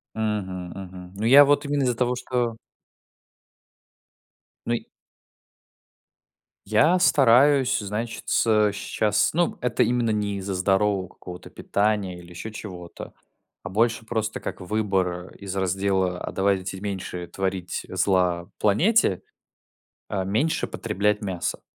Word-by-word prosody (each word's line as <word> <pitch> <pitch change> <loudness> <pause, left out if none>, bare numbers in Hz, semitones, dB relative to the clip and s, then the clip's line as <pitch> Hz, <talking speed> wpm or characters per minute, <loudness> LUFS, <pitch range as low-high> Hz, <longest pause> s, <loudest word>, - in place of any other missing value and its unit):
Мгм 95 -5 -3
мгм. 90 -1 -9
Ну, 105 +3 -3
я 135 +5 +9
вот 145 +1 +2
именно 145 -1 0
из-за 125 -2 +1
того, 125 +1 0
что 120 -2 -2 2.1
Ну, 120 - 0
й - - -5 1.8
Я 170 +4 +4
стараюсь, 135 -3 +5
значится, 105 0 +1
щас 105 +1 0
ну, 170 +2 +1
это 125 -1 +1
именно 120 -1 +1
не 105 -1 -1
из-за 95 0 -4
здорового 95 0 +1
какого-то 90 -1 -11
питания 100 -3 -1
или 85 0 -13
еще 90 +5 -7
чего-то, 90 -5 -9 0.5
а 95 - -6
больше 115 +3 +1
просто 110 -1 -2
как - - -6
выбор 95 -3 -1
из 100 -2 -7
раздела: 95 -1 0
"А - - -4
давайте 95 -1 0
меньше 95 -3 -5
творить 95 -1 -3
зла 90 -2 +1
планете"- 110 - +3 0.9
э, 95 -1 -2
меньше 110 +12 0
потреблять 105 +2 -1
мяса. 95 -4 -3
100 Hz, 120 wpm, -24 LUFS, 95-115 Hz, 2.1 s, я